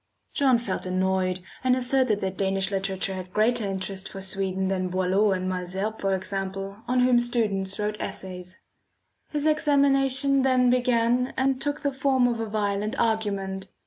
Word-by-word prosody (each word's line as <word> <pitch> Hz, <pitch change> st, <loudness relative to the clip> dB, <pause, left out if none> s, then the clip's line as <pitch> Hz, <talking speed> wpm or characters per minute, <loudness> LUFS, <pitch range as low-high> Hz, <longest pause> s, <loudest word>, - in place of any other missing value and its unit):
John 265 Hz, -3 st, +4 dB
felt 200 Hz, -5 st, -3 dB
annoyed, 185 Hz, 0 st, 0 dB, 0.2 s
and 255 Hz, -1 st, +4 dB
asserted 255 Hz, -4 st, +2 dB
that 190 Hz, 0 st, -2 dB
Danish 195 Hz, 0 st, 0 dB
literature 195 Hz, 0 st, -2 dB
had 185 Hz, -1 st, -7 dB
greater 220 Hz, +2 st, +2 dB
interest 190 Hz, +1 st, -4 dB
for 195 Hz, -, -8 dB
Sweden 190 Hz, 0 st, -2 dB
than 185 Hz, -1 st, -1 dB
Boileau 190 Hz, +3 st, +2 dB
and 185 Hz, -1 st, -1 dB
Malesherbes, 185 Hz, +4 st, -3 dB
for 195 Hz, -1 st, +1 dB
example, 195 Hz, +1 st, -4 dB
on 250 Hz, 0 st, +2 dB
whom 250 Hz, -1 st, +5 dB
students 210 Hz, -6 st, -1 dB
wrote 210 Hz, 0 st, -2 dB
essays. 180 Hz, -1 st, -7 dB, 0.7 s
His 295 Hz, -1 st, -2 dB
examination 275 Hz, -3 st, +3 dB
then 255 Hz, -2 st, +3 dB
began 245 Hz, 0 st, +1 dB
and 265 Hz, 0 st, +1 dB
took 290 Hz, +1 st, -2 dB
the 280 Hz, -1 st, -1 dB
form 265 Hz, -2 st, +2 dB
of 235 Hz, -2 st, -1 dB
a 225 Hz, -, -2 dB
violent 210 Hz, 0 st, -1 dB
argument. 200 Hz, -4 st, -1 dB
205 Hz, 155 wpm, -26 LUFS, 190-250 Hz, 0.7 s, whom